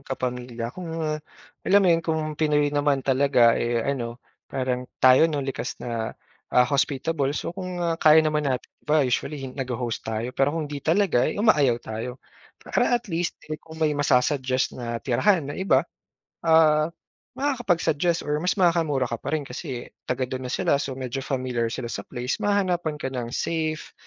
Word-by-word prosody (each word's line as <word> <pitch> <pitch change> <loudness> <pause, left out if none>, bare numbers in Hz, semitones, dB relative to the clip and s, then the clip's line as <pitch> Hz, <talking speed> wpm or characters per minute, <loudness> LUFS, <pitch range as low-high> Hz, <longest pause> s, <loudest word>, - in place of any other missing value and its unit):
Kapamilya, 125 -3 -4
kung 180 -2 -7
ah, 155 -1 -2 0.4
alam 200 - +4
mo - - +4
yun 165 - +2
kung 160 -1 -1 0.2
Pinoy 150 -2 +2
naman 145 -2 +1
talaga 130 -3 +4
eh, 120 -1 0
ano, 120 -4 -2 0.3
parang 125 -1 -2 0.2
tayo, 130 +5 +7
'no? 145 -3 -2
Likas 135 -1 -4
na 115 -2 -3 0.4
ah, 125 - +5
hospitable. 140 +1 0
So, - - -3
kung 185 -1 -4
ah, 165 -1 -1
kaya 155 0 +7
naman 150 -2 +1
natin, 130 -2 -1 0.2
iba 150 -1 +2
usually 135 +3 -2
nagho-host 125 -3 -3
tayo. 115 +3 -2
Pero 135 +4 +1
kung 160 - -1
hindi 145 - -4
talaga, 160 -4 +2
eh, - - -4
umayaw 150 - +4
tayo. 115 +3 -5 0.4
Para 245 - +1
at 240 - -8
least 165 +1 -1 0.2
eh, 155 - -4
kung 160 0 -13
may 155 -2 +1
ma-susuggest 130 -2 +1
na 120 -1 -4
tirahan 160 - +3
ng - - -7
iba. 195 - +3 0.6
Ah, 155 -1 +5 0.5
makakapag-suggest 180 - +1
or 150 0 -1
mas 180 +3 0
makakamura 165 -8 +2
ka 115 - -2
pa 140 +6 -3
rin 155 - -1
kasi 135 -3 -6 0.2
taga-dun 130 0 -2
na - - -5
sila, 140 - +2
so 135 -2 -3
medyo 130 0 -4
familiar 130 -3 -1
sila 120 +1 -5
sa 100 - -4
place, 125 +1 -3
mahanapan 180 -6 +1
ka 135 -3 -4
ng 125 -3 -3
safe 155 +4 -2
140 Hz, 170 wpm, -25 LUFS, 125-160 Hz, 0.6 s, tayo